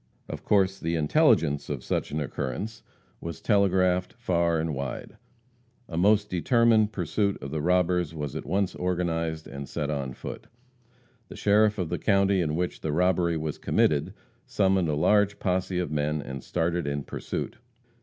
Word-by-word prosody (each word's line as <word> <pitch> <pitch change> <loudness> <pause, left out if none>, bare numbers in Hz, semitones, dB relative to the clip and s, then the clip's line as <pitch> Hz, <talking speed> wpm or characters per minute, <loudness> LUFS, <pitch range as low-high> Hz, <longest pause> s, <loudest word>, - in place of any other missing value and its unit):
Of - - -7
course 95 -2 +2
the 85 +1 -1
intelligence 75 -1 +2
of - - -4
such - - -2
an 75 - -3
occurrence 75 +10 -4 0.4
was 85 -1 -6
telegraphed 95 -3 +2
far 85 -2 0
and 80 -1 -1
wide. 70 -2 -5 0.7
A 85 - -7
most 105 +4 +3
determined 110 +3 +3
pursuit 100 +1 -1
of 70 - -7
the 80 -1 -2
robbers 90 -1 +2
was 75 -4 -4
at - - -4
once 95 +3 0
organized 85 -3 -2
and 70 0 -7
set 75 +1 -2
on 70 -3 -3
foot. - - -8 0.8
The - - -10
sheriff 105 +1 +3
of 90 -5 -2
the 85 - -2
county 100 -2 +3
in 75 -2 -1
which 90 +1 -2
the 80 - -2
robbery 85 0 +2
was 80 -1 -4
committed 75 -2 +1 0.3
summoned 95 -4 +2
a 75 - +1
large 105 +6 +3
posse 90 0 -1
of 90 -3 -2
men 75 0 0
and 70 -2 -7
started 85 -2 -1
in 70 0 -2
pursuit. - - -5
85 Hz, 165 wpm, -27 LUFS, 75-95 Hz, 0.8 s, most